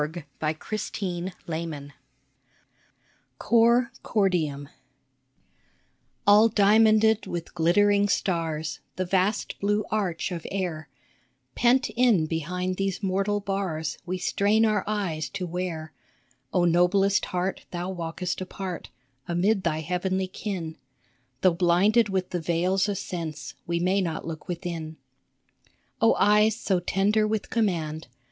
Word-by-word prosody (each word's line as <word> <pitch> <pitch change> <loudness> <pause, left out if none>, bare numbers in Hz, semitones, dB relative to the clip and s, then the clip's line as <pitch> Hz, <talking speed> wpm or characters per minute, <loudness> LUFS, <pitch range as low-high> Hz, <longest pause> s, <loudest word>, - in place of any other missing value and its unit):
COR 155 0 -3
CORDIUM 170 -6 -5 1.5
COR 235 +1 +3
CORDIUM 165 -9 0 1.6
A,L 210 +2 +7
diamonded 220 +1 +4
with 170 -1 -5
glittering 200 +5 +3
stars 160 -6 -1 0.2
The 185 - -1
vast 190 +3 0
blue 205 +1 +1
arch 190 -5 -1
of 170 -2 -5
air; 170 -6 -3 0.6
Pent 250 +2 +3
in 230 -8 +3
behind 180 +4 -2
these 195 0 -2
mortal 195 +2 0
bars 195 -5 -3
We 185 0 -3
strain 205 +4 +2
our 215 -3 +1
eyes 190 -7 -2
to 195 -2 -4
where, 170 -3 -4 0.6
Oh 180 -1 +2
noblest 180 +4 +3
heart, 180 +1 -3
thou 180 +1 -4
walkest 175 +1 -4
apart 185 -1 -6 0.4
Amid 190 +4 +1
thy 155 -2 0
heavenly 185 +3 -1
kin. 185 -5 -5 0.6
Though 185 -2 +5
blinded 190 +6 +3
with 190 -1 -2
the 175 - -2
veils 180 +5 +1
of 200 - -1
sense, 160 -6 -5
We 170 0 0
may 185 +3 +2
not 165 -4 -3
look 160 +1 -7
within. 170 -3 -5 1.0
Oh 225 - +5
eyes 210 +1 +4
so 190 -5 +1
tender 205 +4 +1
with 215 -1 -2
command 165 - -1
185 Hz, 115 wpm, -26 LUFS, 170-205 Hz, 1.6 s, A,L